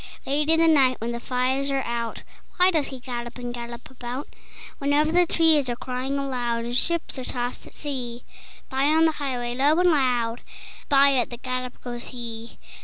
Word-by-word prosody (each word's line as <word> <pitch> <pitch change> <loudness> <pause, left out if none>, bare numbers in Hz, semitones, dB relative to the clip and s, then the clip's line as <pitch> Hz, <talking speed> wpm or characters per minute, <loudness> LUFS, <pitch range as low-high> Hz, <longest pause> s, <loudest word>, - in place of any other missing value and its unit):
Late 295 +3 0
in 325 0 +5
the 330 - +5
night 270 -5 +5
when 230 +2 -3
the 235 - -4
fires 260 +3 0
are 275 -1 0
out, 235 -1 -3 0.3
Why 365 +1 +5
does 315 -5 +1
he 265 - -7
gallop 240 -1 -6
and 245 -1 -5
gallop 235 0 -7
about? 250 +2 -6 0.5
Whenever 290 +2 +2
the 355 +1 +4
trees 315 -6 +4
are 240 - -1
crying 255 +3 -3
aloud, 245 -4 -2
And 240 +1 -3
ships 330 0 +1
are - - -4
tossed 245 0 -3
at - - -14
sea, 250 -5 -4 0.4
By, 265 +1 0
on 315 +2 +4
the 320 - +4
highway, 255 -5 -3
low 285 +6 +3
and 360 -1 +5
loud, 245 -5 +1 0.5
By 280 0 +6
at 250 -3 +1
the 240 - -7
gallop 255 0 -4
goes 240 -1 -5
he. 235 -2 -7
255 Hz, 190 wpm, -25 LUFS, 240-285 Hz, 0.5 s, By